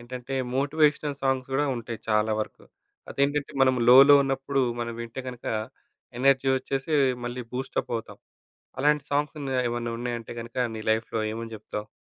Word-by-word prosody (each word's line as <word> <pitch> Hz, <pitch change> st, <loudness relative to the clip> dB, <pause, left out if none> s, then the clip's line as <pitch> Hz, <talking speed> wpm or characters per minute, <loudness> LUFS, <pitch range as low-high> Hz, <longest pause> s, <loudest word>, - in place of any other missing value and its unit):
ఏంటంటే 125 Hz, +2 st, -7 dB, 0.2 s
motivational 145 Hz, 0 st, +1 dB
songs 135 Hz, -1 st, 0 dB
గూడా 145 Hz, +2 st, +2 dB
ఉంటాయి 115 Hz, -1 st, -6 dB
చాలా 105 Hz, 0 st, +2 dB
వరకు. -, -, -6 dB, 0.5 s
అదేంటంటే, 140 Hz, +1 st, 0 dB
మనం 130 Hz, -1 st, +5 dB
లోలో 135 Hz, +3 st, +9 dB
ఉన్నప్పుడు. 135 Hz, 0 st, 0 dB, 0.2 s
మనం 115 Hz, 0 st, -3 dB
వింటే 115 Hz, +3 st, -6 dB
గనుక, 125 Hz, -1 st, -9 dB, 0.7 s
ఎనర్జీ 135 Hz, 0 st, +4 dB
వచ్చేసి, 135 Hz, +3 st, -3 dB, 0.3 s
మళ్ళీ 120 Hz, +1 st, -4 dB
బూస్టపవుతాం. 125 Hz, -3 st, -4 dB, 0.6 s
అలాంటి 150 Hz, 0 st, +3 dB
సాంగ్సున్నాయా? 140 Hz, -3 st, -1 dB
ఏమన్నా 120 Hz, 0 st, -3 dB
ఉన్నాయంటే 120 Hz, -2 st, -4 dB
గనుక 115 Hz, +2 st, -10 dB, 0.2 s
నీ 110 Hz, -, -5 dB
లైఫ్‌లో 110 Hz, 0 st, -1 dB
ఏమని 115 Hz, 0 st, -6 dB
జేప్తావు? 105 Hz, 0 st, -6 dB
130 Hz, 135 wpm, -26 LUFS, 115-140 Hz, 0.7 s, లోలో